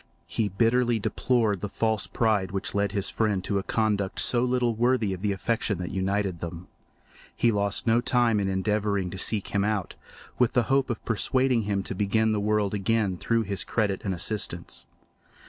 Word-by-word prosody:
He 110 -2 -1
bitterly 115 +4 +2
deplored 110 -2 0
the 105 - -3
false 110 +1 -1
pride 105 -5 +1
which 95 -1 -3
led 100 -1 0
his 100 -2 -1
friend 105 -4 0
to 100 - 0
a - - -5
conduct 105 -3 0
so 120 -1 +2
little 125 -1 +1
worthy 115 -3 +1
of 90 - -7
the 105 0 0
affection 105 0 -1
that 90 0 -5
united 95 -1 -1
them. 85 +1 -7 0.7
He 120 - +3
lost 100 -2 -1
no 115 +1 +3
time 120 -4 +2
in 95 -1 0
endeavouring 100 -1 0
to 95 - -4
seek 105 0 +1
him 100 -1 0
out, 105 -3 -1 0.5
with 125 -2 +3
the 120 - +3
hope 135 -1 +2
of 120 - -4
persuading 125 +1 +1
him 100 -1 -1
to - - -5
begin 105 +3 +1
the 105 - 0
world 105 -1 +1
again 105 -1 0
through 115 +5 0
his 100 -2 -2
credit 105 -4 -1
and 100 - -1
assistance. 90 -1 -2
105 Hz, 185 wpm, -26 LUFS, 100-115 Hz, 0.7 s, He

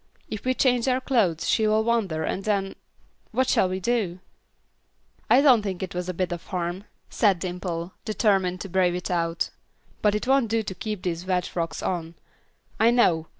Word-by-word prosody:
If 215 - -5
we 255 0 +1
change 250 -2 +2
our 255 0 +2
clothes 215 - +1
she 220 - +3
will 215 +1 +3
wonder 210 -9 0
and 190 - -2
then 195 -2 0 0.6
What 255 +3 +1
shall 185 - +3
we 185 +1 -2
do?" 200 -4 0 1.1
"I 260 - +6
don't 260 -6 +6
think 190 -3 -4
it 185 - -5
was 180 0 -3
a - - -1
bit 185 0 -1
of 175 -1 -6
harm," 180 +1 -3 0.3
said 200 -4 +3
Dimple, 175 0 -4
determined 195 -4 +1
to - - -5
brave 180 -1 +2
it 180 0 -4
out, 170 -1 -1 0.5
"but 210 -1 +3
it 210 - -2
won't 265 -3 +3
do 225 0 +1
to 195 - -5
keep 210 +1 -5
these 175 0 -3
wet 180 -1 +1
frocks 165 -1 -4
on. 170 -2 -3 0.6
I 225 - +5
know. 175 -10 +3
190 Hz, 190 wpm, -25 LUFS, 175-220 Hz, 1.1 s, I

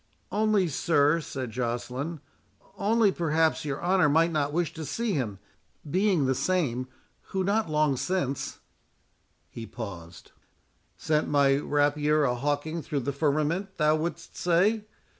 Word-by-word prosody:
"Only, 210 -3 +2
sir," 150 +1 +2
said 130 -6 -5
Joceline, 125 +6 -3 0.5
"only 215 +1 +3
perhaps 160 -2 +1
your 145 +1 -3
honour 180 -4 +3
might 165 +3 +3
not 145 -2 0
wish 170 0 -1
to 160 - -6
see 225 +7 -2
him, 115 - -2 0.5
being 185 -2 +2
the 130 - +2
same 130 -6 0 0.4
who, 190 -1 -1
not 205 0 +1
long 150 -2 +2
since"— 160 -5 -2 0.9
He 115 -1 -7
paused. 95 -7 -9 0.7
"Sent 155 0 0
my 140 -2 +4
rapier 145 +1 +2
a 125 -3 +2
hawking 145 +5 -2
through 145 -2 -3
the 140 +3 -2
firmament, 155 +7 0
thou 150 0 +3
wouldst 170 +2 -4
say? 195 +5 +2
150 Hz, 135 wpm, -27 LUFS, 140-175 Hz, 0.9 s, my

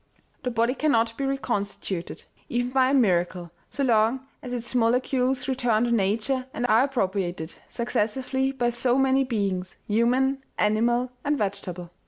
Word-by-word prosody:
" - - -40
The - - +1
body 235 +1 +1
cannot 230 -6 +1
be 275 +2 -2
reconstituted, 205 -9 -3 0.3
even 245 +1 -1
by 260 0 +3
a - - +1
miracle, 180 -7 +1 0.2
so 280 - -2
long 235 +2 +2 0.2
as 250 - -7
its 240 -1 -4
molecules 250 +2 +1
return 245 -4 +1
to 240 - 0
nature 230 +5 0
and 240 - -1
are 225 -1 +5
appropriated, 190 - -2 0.2
successively, 255 +3 -1
by 245 -3 0
so 245 +1 +1
many 270 0 +3
beings 195 -7 -2
human, 255 +5 +2
animal 240 +4 +2
and 290 0 +1
vegetable. 190 -5 -4
240 Hz, 150 wpm, -25 LUFS, 210-260 Hz, 0.3 s, are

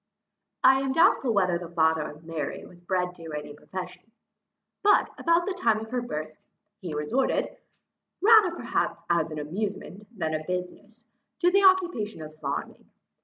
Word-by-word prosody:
I 265 +1 +7
am 270 -1 -1
doubtful 330 -6 +4
whether 185 -5 +2
the 175 -1 -8
father 160 -1 +2
of 150 +2 -13
Mary 160 -3 -5
was 175 -1 -16
bred 180 0 -1
to 165 -3 -10
any 150 -1 -6
profession; 180 +5 -8 0.7
but, 410 0 +4
about 335 +1 +2
the 395 - -2
time 355 -12 +1
of 220 +1 -9
her 250 -1 -1
birth, 155 -9 -5 0.4
he 170 -5 -6
resorted, 225 - 0 0.6
rather 435 -2 +7
perhaps - - -2
as 165 -2 +2
an 155 - -6
amusement 195 +5 -5
than 160 -3 -2
a 155 0 -2
business, 180 +6 -6 0.3
to 355 0 +3
the 395 +1 +4
occupation 350 - +2
of 155 0 -10
farming. 140 -1 -5
185 Hz, 160 wpm, -27 LUFS, 160-260 Hz, 0.7 s, I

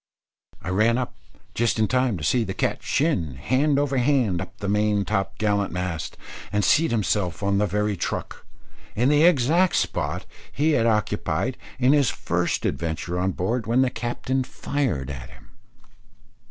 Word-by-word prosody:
I - - -4
ran 110 +5 +3
up 125 -1 -3 0.4
just 115 0 +1
in 110 -1 +2
time 125 -3 +1
to 75 - -7
see 120 - +2
the 95 -3 -5
cat - - -1
shin 95 - 0
hand 130 - +1
over 140 -1 +1
hand 120 -9 +2
up 95 - -9
the 100 - -5
main 105 0 +1
top 95 0 -1
gallant 100 -2 0
mast, 90 -2 -4 0.3
and 105 -1 +1
seat 160 - +4
himself 105 -4 -1
on 100 0 +2
the 105 - +2
very 105 +2 0
truck, 85 - -4 0.5
in 125 +5 +2
the 150 0 +4
exact 170 +2 +4
spot - - -1 0.3
he 155 +3 +1
had 115 -6 +3
occupied 105 -3 0 0.2
in 130 +2 +4
his 145 -4 +3
first - - -1
adventure 85 +2 -2
on 95 +1 0
board, 110 +6 -2
when 120 +3 +3
the 130 - 0
captain 125 +3 -2
fired 125 - -2
at 65 -3 -8
him. 65 +1 -18
110 Hz, 165 wpm, -24 LUFS, 95-130 Hz, 0.5 s, seat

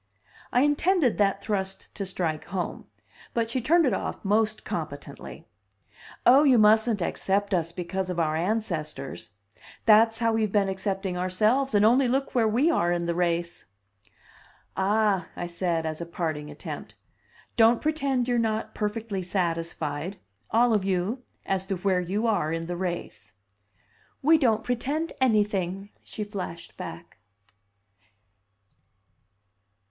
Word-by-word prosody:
I 245 - +3
intended 295 - +2
that 195 -1 +2
thrust 195 -2 -3
to 200 -2 -5
strike 165 -4 -2
home, 180 -1 -4 0.5
but 230 -1 0
she 255 - -1
turned 330 +7 +4
it 250 - +2
off 190 - -4
most 215 +2 +1
competently. - - -6 0.8
"Oh, 265 +3 +8
you 270 -5 +5
mustn't 220 -1 +4
accept 200 +3 -1
us 170 -2 0
because 185 +2 -3
of 180 -1 -2
our 155 -2 +1
ancestors. 165 -6 -3 0.6
That's 225 +1 +6
how 230 0 +1
we've 220 -2 +1
been 200 -2 +2
accepting 190 -1 -2
ourselves, 215 +8 +1
and 205 +1 +5
only 250 +4 +5
look 270 +3 -1
where 235 -4 +3
we 255 +10 +3
are 175 - +1
in 175 -1 0
the 170 - 0
race!" 170 0 -1 1.1
"Ah!" 200 -2 +1
I 175 - -4
said, 170 -1 -1
as 155 +1 -4
a 170 - -5
parting 155 -3 -3
attempt, 150 - -8 0.6
"don't 230 +1 +5
pretend 275 -5 0
you're 245 -1 +2
not 220 -1 -1
perfectly 210 -2 -3
satisfied 170 -2 -2 0.3
all 235 +1 +4
of 210 -3 +2
you 195 +6 -1 0.2
as 190 0 -1
to 195 - -1
where 185 0 +1
you 195 +6 -2
are 205 -9 +1
in 165 0 -2
the 175 +1 -4
race!" 175 - -5 0.9
"We 315 +3 +6
don't 225 -6 +2
pretend 280 +7 -2
anything!" 205 -5 +1
she 215 - -6
flashed 195 -5 -7
back. - - -9
200 Hz, 140 wpm, -26 LUFS, 175-230 Hz, 1.1 s, Oh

